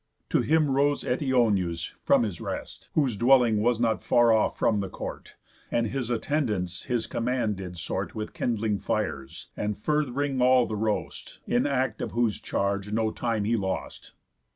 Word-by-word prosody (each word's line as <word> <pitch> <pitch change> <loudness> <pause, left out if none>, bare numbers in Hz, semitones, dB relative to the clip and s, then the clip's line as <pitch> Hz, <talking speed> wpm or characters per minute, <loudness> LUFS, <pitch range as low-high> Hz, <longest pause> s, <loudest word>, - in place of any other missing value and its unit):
To - - +3
him 155 -2 +2
rose 140 +2 +2
Eteoneus 115 - +1
from - - +4
his 100 -7 -4
rest, - - -6
Whose 135 -7 +2
dwelling 120 -1 +4
was 120 +1 +2
not 115 -2 +1
far 120 -2 +4
off 110 - +1
from 105 -2 +2
the 95 -1 -3
court, - - -7 0.3
And 120 -1 +1
his 125 +1 -3
attendance 110 - -1
his 120 -3 -1
command 120 -3 -1
did 90 -2 -7
sort - - -4
With 110 0 -5
kindling 110 -3 -1
fires, 65 -1 -3
and 105 -1 -2
furth'ring 140 0 0
all 125 -1 +5
the 110 - -4
roast, 105 0 -3
In 125 +4 +1
act 130 -5 -1
of - - -4
whose 115 -2 +1
charge 100 0 -1
heard 105 +1 -4
no 110 -1 +1
time 115 -3 -1
he 115 +3 +1
lost. 95 -3 -4
115 Hz, 170 wpm, -27 LUFS, 105-130 Hz, 0.3 s, all